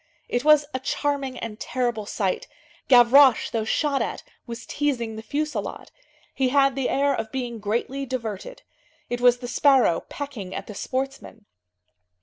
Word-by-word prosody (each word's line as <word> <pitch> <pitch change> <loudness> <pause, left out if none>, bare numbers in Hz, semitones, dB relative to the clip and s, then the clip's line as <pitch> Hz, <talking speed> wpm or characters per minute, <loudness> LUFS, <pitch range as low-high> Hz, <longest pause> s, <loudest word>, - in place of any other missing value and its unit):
It 245 +1 -1
was 305 -1 +6
a 260 - -1
charming 275 -1 -2
and 220 -2 -6
terrible 240 -4 -2
sight. 195 -4 -2 0.4
Gavroche, 255 0 +6
though 225 -2 -1
shot 280 +4 0
at, 225 - -3 0.2
was 235 0 -7
teasing 245 -7 -2
the 220 - -6
fusillade. 285 -1 -4 0.4
He 265 -2 +1
had 275 0 +4
the 270 -1 -1
air 280 +1 +2
of 225 -3 -4
being 245 -3 -4
greatly 240 +6 -2
diverted. 240 - -5 0.5
It 245 0 -2
was 245 0 +5
the 245 0 -7
sparrow 260 - +4
pecking 245 -11 -6
at - - -5
the 210 - -9
sportsmen. 260 -2 -5
250 Hz, 150 wpm, -24 LUFS, 225-275 Hz, 0.5 s, was